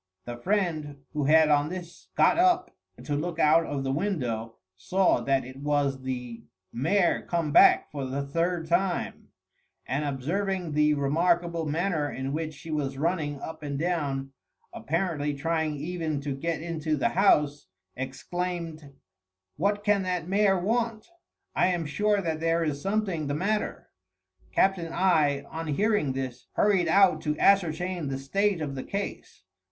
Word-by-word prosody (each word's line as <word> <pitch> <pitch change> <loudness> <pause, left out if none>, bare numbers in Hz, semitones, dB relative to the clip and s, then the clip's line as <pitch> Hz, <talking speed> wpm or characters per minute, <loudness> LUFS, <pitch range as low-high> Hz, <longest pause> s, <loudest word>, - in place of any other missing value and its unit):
The 120 - -5
friend, 155 -4 -1
who 150 -2 -1
had 155 +1 +5
on 145 0 +3
this 175 -1 -8
got - - +4
up 360 0 +3 0.3
to 145 - -3
look 165 +3 -3
out 160 +1 +4
of 140 -2 -3
the 135 - -1
window, 125 - -2 0.2
saw 185 - +2
that 135 -2 +1
it 130 +1 -10
was 140 -1 0
the 125 -3 -5 0.3
mare 170 +9 +2
come 165 -4 -2
back - - +6
for 140 -2 -4
the 140 +2 -2
third 165 +3 -1
time; 175 +2 -1 0.6
and 140 +3 -1
observing 170 +6 -2
the 150 0 +3
remarkable 170 +3 +1
manner 160 -1 0
in 135 +1 -4
which 155 0 -3
she 160 +3 -9
was 140 -3 -2
running 150 -2 -1
up 160 - -7
and 145 -2 -4
down, 140 -5 -2 0.4
apparently 150 +2 -1
trying 160 +1 -1
even 160 0 -3
to 140 -1 -3
get 160 +3 -3
into 160 -2 -2
the - - +1
house, 150 -7 +2 0.3
exclaimed, 160 +2 -5 0.6
"What 205 +5 0
can 205 -1 +3
that 180 -3 -2
mare 195 0 +3
want? 225 - -1 0.4
I - - +3
am 175 -3 0
sure 205 +6 +1
that 160 -2 -2
there 165 +1 +1
is 145 -3 -2
something 195 -6 -1
the 145 - -1
matter." 210 +6 -2 0.6
Captain 185 -4 +1
I 155 -6 +2
on 160 0 -5
hearing 175 -2 +1
this 130 -2 -5
hurried 195 -4 +3
out 180 -2 +4
to 150 0 -1
ascertain 180 -3 +2
the 135 -1 -2
state 195 +7 0
of 145 -3 -3
the 130 - -5
case. 200 0 -6
160 Hz, 155 wpm, -27 LUFS, 145-180 Hz, 0.6 s, back